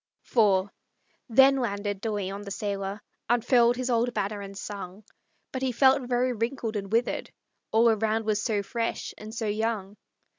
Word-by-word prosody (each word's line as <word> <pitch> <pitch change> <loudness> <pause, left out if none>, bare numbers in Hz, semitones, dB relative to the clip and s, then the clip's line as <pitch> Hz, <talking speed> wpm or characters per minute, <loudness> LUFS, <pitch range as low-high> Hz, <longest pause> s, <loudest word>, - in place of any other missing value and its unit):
IV 200 -4 +3 0.6
Then 270 +4 +6
landed 205 -5 -2
De 225 - -2
Leon, 200 -1 -3
the 205 - -8
sailor, 200 0 -3 0.3
Unfurled 240 0 +4
his 255 0 -2
old 235 +1 +1
banner, 205 0 -2
and 195 0 -8
sung; 200 0 -7 0.5
But 260 - -4
he 260 -1 +1
felt 260 +1 +4
very 250 +1 +1
wrinkled 230 0 -2
and 200 -1 -4
withered, 235 +2 0 0.4
All 225 +2 +5
around 220 0 +1
was 210 -1 +1
so 210 -3 0
fresh 230 +3 -3
and 215 +1 -8
so 225 0 -3
young. 210 -1 -2
220 Hz, 160 wpm, -27 LUFS, 205-240 Hz, 0.6 s, Then